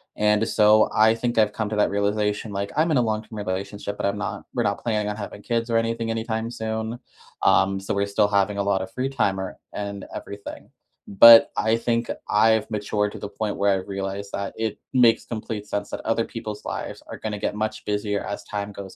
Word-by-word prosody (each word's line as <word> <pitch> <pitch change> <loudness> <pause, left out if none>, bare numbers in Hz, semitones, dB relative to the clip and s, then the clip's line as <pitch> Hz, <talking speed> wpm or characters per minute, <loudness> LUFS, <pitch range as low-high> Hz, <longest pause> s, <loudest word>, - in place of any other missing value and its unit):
And 105 +1 +2
so, 110 0 +5
I 110 +1 +5
think 120 0 -2
I've 105 -1 +4
come 110 -1 -2
to 110 - -3
that 105 - +3
realization, 105 +1 -1
like, 100 +1 -3
I'm 160 +2 +3
in 150 - +3
a - - +4
long 110 -2 0
term 110 0 -10
relationship, 100 +1 -4
but - - -2
I'm 100 +1 0
not 105 - -4
we're - - 0
not - - -1
planning 105 -3 0
on 105 - -3
having 100 -1 -7
kids 115 0 -1
or 115 - 0
anything 115 0 -1
anytime 115 0 -2
soon, 110 +1 -4 0.4
um, 95 0 +4
so 95 - -3
we're 100 0 +1
still 100 +1 +2
having 100 0 +1
a 100 - 0
lot 100 -1 +1
of 95 - -5
free 130 +4 -2
time 110 -8 0
or 95 -1 -5 0.2
and 100 -1 -5
everything. 100 0 -8 0.4
But 115 +3 +9
I 110 +1 +2
think 115 0 -1 0.2
I've 110 0 +3
matured 105 0 -1
to - - -8
the - - -5
point 105 0 -3
where 100 0 +3
I - - +3
realized 100 +1 -5
that 100 0 -3
it 110 -2 -2 0.2
makes 120 -3 +4
complete 110 -2 -5
sense 105 0 -3
that - - -5
other 115 +1 +1
people's 110 -2 -7
lives - - -5
are - - -7
gonna 105 -1 -4
get - - -1
much 110 0 -3
busier 105 -1 -1
as 100 - -5
time 105 0 -4
goes 100 -1 -9
105 Hz, 220 wpm, -24 LUFS, 100-110 Hz, 0.4 s, But